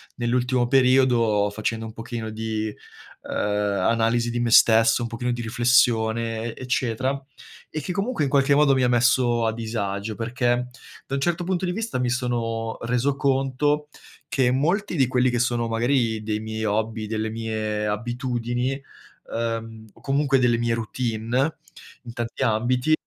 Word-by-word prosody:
nell'ultimo 125 0 +1
periodo 125 -5 +3
facendo 110 +2 -3
un 110 - -8
pochino 115 0 -5
di, 110 0 -3
ehm, 105 - -13
analisi 110 +3 +1
di 120 0 -2
me 120 -1 0
stesso, 115 +1 +6
un 120 - -2
pochino 120 +2 -3
di 120 0 -3
riflessione 115 -1 +1
e - - -13
eccetera, 130 +2 -1 0.5
e 155 - -4
che 180 - -4
comunque 205 +1 -1
in - - -1
qualche 140 +1 +3
modo 145 -1 +5
mi 130 -1 +2
ha - - +4
messo 120 -1 +3
a 110 - +1
disagio. 110 -2 -3
Perché, 120 +2 0 0.4
da 135 - -2
un 135 - -2
certo 175 +3 0
punto 185 +1 -1
di 180 - -1
vista, 220 - -3
mi 125 -1 0
sono 115 -3 -2
reso 125 +4 0
conto 140 +2 +1 0.4
che 125 -2 +2
molti 175 +10 0
di 135 -5 +3
quelli 125 0 +2
che 120 0 -1
sono 120 -1 0
magari 115 -1 +1
dei 105 0 -2
miei 110 0 -4
hobby, 110 +1 -1
delle 110 0 -2
mie 110 -1 -3
abitudini, 120 +3 -2 0.6
ehm, 115 -1 -3
o - - -21
comunque 140 -1 +2
delle 120 -2 +3
mie 120 0 0
routine 115 +4 -1 0.5
in 120 -2 -9
tanti 120 -1 -3
ambiti, 125 +6 +1
120 Hz, 160 wpm, -24 LUFS, 115-130 Hz, 0.6 s, stesso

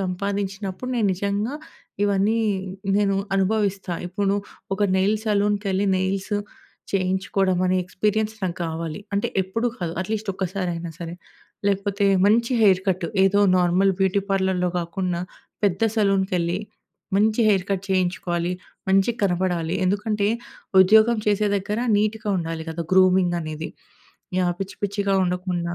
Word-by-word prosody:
సంపాదించినప్పుడు 195 +3 -3
నేను 220 - +2
నిజంగా 200 +6 -2 0.5
ఇవన్నీ 205 +2 +2 0.6
నేను 200 -1 +2 0.2
అనుభవిస్తా. 195 -2 0
ఇప్పుడు 195 +2 0 0.4
ఒక 205 - -9 0.2
నెయిల్స్ 210 +3 +1
సెలూన్‌కెళ్లి 205 -1 +1
నెయిల్స్ 190 +2 -1 0.6
చేయించుకోవడం 190 0 +1
అనే 185 0 +2
ఎక్స్‌పీరియన్స్ 210 +4 -1
నాకు 180 -2 -2
గావాలి. 165 +1 -4
అంటే 200 - 0
ఎప్పుడూ 190 +6 -2
కాదు. 170 -2 -3
అట్లీస్ట్ 215 +1 -3
ఒక్కసారి 190 -1 -2
అయినా 170 0 -5
సరే. 170 -1 -6 0.5
లేకపోతే 200 +1 0 0.2
మంచి 230 +4 +3
హెయిర్ 190 -3 +5
కట్. 185 -2 0 0.2
ఏదో 200 +1 +3 0.2
నార్మల్ 180 +2 +3
బ్యూటీ 190 +1 +2
పార్లర్‌లో 190 -2 +1
గాకుండా, 175 0 -2 0.4
పెద్ద 200 +2 +1
సలూన్‌కెళ్లి 190 -4 +1 0.6
మంచి 215 +3 +3
హెయిర్ 195 -3 +3
కట్ 195 -1 -1
చేయించుకోవాలి. 180 -2 0 0.4
మంచిగా 195 +5 +3
కనపడాలి 175 -3 0
ఎందుకంటే, 205 +1 0 0.5
ఉద్యోగం 220 +4 +5
చేసే 210 0 +2
దగ్గర 205 +2 -2 0.2
నీట్‌గా 215 +1 -1
ఉండాలి 165 -1 -4
గదా! 165 +1 -4
గ్రూమింగ్ 185 -2 +4
అనేది. 155 0 -5 0.7
యాహ్! 175 -1 +1
పిచ్చి 195 0 -5
పిచ్చిగా 200 0 0
ఉండకుండా. 180 -1 -2
190 Hz, 125 wpm, -23 LUFS, 180-205 Hz, 0.7 s, హెయిర్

